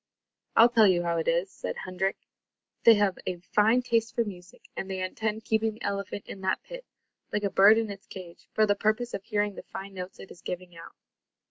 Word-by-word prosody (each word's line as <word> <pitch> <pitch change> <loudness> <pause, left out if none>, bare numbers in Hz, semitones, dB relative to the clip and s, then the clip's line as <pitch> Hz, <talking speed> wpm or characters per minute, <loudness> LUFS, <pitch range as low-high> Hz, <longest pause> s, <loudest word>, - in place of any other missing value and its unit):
"I'll 230 +2 +8
tell 225 -3 +5
you 175 -2 +3
how 170 -1 0
it 165 - -2
is," 170 +3 +1
said - - -5
Hendrik. 190 +1 -1 0.7
"They 230 - +9
have 205 -3 +1
a 185 - -1
fine 210 +7 +2
taste 230 -1 0
for 235 - +2
music, 180 -4 -10
and 190 - -5
they 190 -1 -3
intend 215 +3 -3
keeping 220 0 +1
the - - -12
elephant 200 0 -3
in 195 - -9
that 190 0 -1
pit, - - -9 0.5
like 210 - -1
a 200 - 0
bird 205 +3 +7
in 225 -2 -1
its 195 -1 -11
cage, 175 -3 -11
for 215 - +3
the 205 - +3
purpose 215 +4 0
of 195 - -4
hearing 210 -1 0
the - - -8
fine 195 +1 -8
notes 185 -1 -7
it - - -11
is - - -13
giving 180 -1 -6
out." 165 - -12
200 Hz, 220 wpm, -28 LUFS, 185-220 Hz, 0.7 s, They